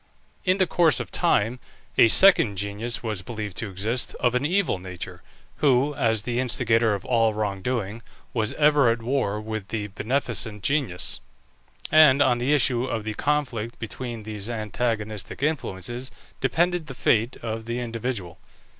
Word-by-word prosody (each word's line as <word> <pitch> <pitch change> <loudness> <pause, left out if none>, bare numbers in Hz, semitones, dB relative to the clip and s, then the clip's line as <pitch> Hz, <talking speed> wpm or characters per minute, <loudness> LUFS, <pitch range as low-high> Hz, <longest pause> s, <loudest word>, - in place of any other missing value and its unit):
In 185 +1 +3
the 190 - +4
course 165 - +3
of - - -6
time 115 +5 +1 0.4
a - - +7
second 125 - +6
genius 105 +5 -3
was 110 -5 -2
believed 105 0 -6
to 110 - -2
exist, 110 +6 -2
of 125 -1 +2
an 125 +1 +1
evil 185 - +1
nature, 90 -1 -8 0.4
who, 140 0 +3
as 110 -5 0
the 120 +1 -1
instigator 115 -3 +2
of 100 - -8
all 115 -3 +2
wrong 100 -3 -2
doing, 115 -2 -2 0.3
was 110 -3 0
ever 150 -4 +4
at 115 0 -1
war 120 -5 0
with 110 -2 -5
the 105 -1 -3
beneficent 110 -1 -2
genius; 135 -11 0 0.7
and 150 -3 +7
on 130 -4 +3
the 125 +4 0
issue 130 -4 +2
of 115 -4 -3
the 110 0 -3
conflict 130 -4 -1
between 115 0 -6
these 105 0 -6
antagonistic 110 0 -3
influences, 125 - -2 0.3
depended 170 +4 +1
the 135 - -8
fate 115 +1 +2
of 110 -1 -4
the 120 +1 -3
individual. 115 -7 -4
115 Hz, 155 wpm, -25 LUFS, 105-130 Hz, 0.7 s, a